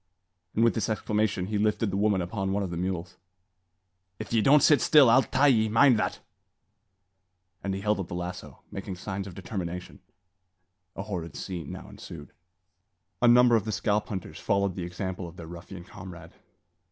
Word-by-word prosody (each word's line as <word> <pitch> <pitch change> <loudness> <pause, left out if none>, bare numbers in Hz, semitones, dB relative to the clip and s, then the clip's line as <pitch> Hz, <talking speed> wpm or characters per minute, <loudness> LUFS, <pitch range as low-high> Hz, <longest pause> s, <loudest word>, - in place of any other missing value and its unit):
And 115 - +3
with 115 - +4
this 115 - -2
exclamation 105 -3 0
he 105 +1 -2
lifted 105 0 +1
the - - -2
woman 100 -2 +2
upon 95 +2 -3
one 100 0 0
of 95 - -4
the - - -3
mules. 90 0 -3 1.0
"If - - -7
ye 115 - +4
don't 145 +5 +5
sit 150 - +5
still, 145 -6 +6
I'll 130 +3 +6
tie 135 +2 +1
ye; 110 -6 +4
mind 115 +1 +5
that!" - - -2 1.4
and 95 -1 -2
he 95 - -5
held 105 0 +1
up 95 - -4
the - - -6
lasso, 90 +1 -7
making 95 -1 -6
signs 95 +1 -5
of 95 - -9
his 100 - -9
determination. 90 -3 -5 1.0
A 95 - -4
horrid 90 -6 -5
scene 90 -3 -6
now - - -8
ensued. - - -11 0.9
A 120 - +5
number 120 0 +6
of 110 - +2
the 110 - -2
scalp 105 +2 0
hunters 95 -6 -6
followed 100 -2 +1
the 90 - -4
example 90 0 -5
of 85 +1 -12
their 85 - -8
ruffian 85 +2 -9
comrade. 90 -4 -11
100 Hz, 185 wpm, -27 LUFS, 90-110 Hz, 1.4 s, still